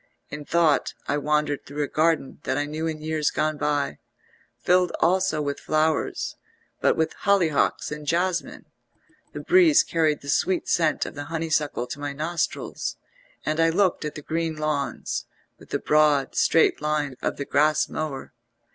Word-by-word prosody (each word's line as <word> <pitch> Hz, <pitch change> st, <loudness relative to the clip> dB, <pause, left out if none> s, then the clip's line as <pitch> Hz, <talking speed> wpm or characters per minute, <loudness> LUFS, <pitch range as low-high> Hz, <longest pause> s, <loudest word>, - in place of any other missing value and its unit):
In 150 Hz, 0 st, -6 dB
thought 165 Hz, -2 st, +2 dB
I 145 Hz, -, +1 dB
wandered 150 Hz, -1 st, 0 dB
through 145 Hz, +1 st, -4 dB
a -, -, -2 dB
garden 155 Hz, -2 st, 0 dB
that 130 Hz, -, -2 dB
I 145 Hz, -, 0 dB
knew 155 Hz, +2 st, -3 dB
in 155 Hz, -1 st, -4 dB
years 155 Hz, -1 st, 0 dB
gone 155 Hz, 0 st, -1 dB
by, 145 Hz, -, -1 dB, 0.6 s
filled 180 Hz, +7 st, +2 dB
also 180 Hz, -4 st, +2 dB
with 145 Hz, 0 st, -3 dB
flowers, 155 Hz, 0 st, 0 dB, 0.4 s
but -, -, +2 dB
with 160 Hz, 0 st, 0 dB
hollyhocks 180 Hz, -10 st, +2 dB
and 150 Hz, 0 st, -6 dB
jasmine; 175 Hz, +1 st, -1 dB, 0.7 s
the -, -, -5 dB
breeze 345 Hz, -4 st, +5 dB
carried 160 Hz, -3 st, 0 dB
the 140 Hz, -, -12 dB
sweet 185 Hz, +5 st, +1 dB
scent 160 Hz, -2 st, +1 dB
of -, -, -7 dB
the 145 Hz, 0 st, -6 dB
honeysuckle 155 Hz, -5 st, -1 dB
to 125 Hz, -, -7 dB
my 145 Hz, 0 st, -4 dB
nostrils, 160 Hz, +4 st, -3 dB, 0.5 s
and 155 Hz, +1 st, -1 dB
I 165 Hz, 0 st, +4 dB
looked 180 Hz, +1 st, +1 dB
at 150 Hz, -, -4 dB
the 150 Hz, -, -8 dB
green 165 Hz, +1 st, -2 dB
lawns, 150 Hz, -5 st, -2 dB, 0.3 s
with -, -, -16 dB
the -, -, 0 dB
broad, 150 Hz, -3 st, +2 dB
straight 165 Hz, -, +3 dB
lines 150 Hz, -3 st, -1 dB
of -, -, -2 dB
the 140 Hz, -, -4 dB
grass 150 Hz, +2 st, +2 dB
mower. 150 Hz, -4 st, -5 dB
155 Hz, 165 wpm, -25 LUFS, 145-165 Hz, 0.7 s, breeze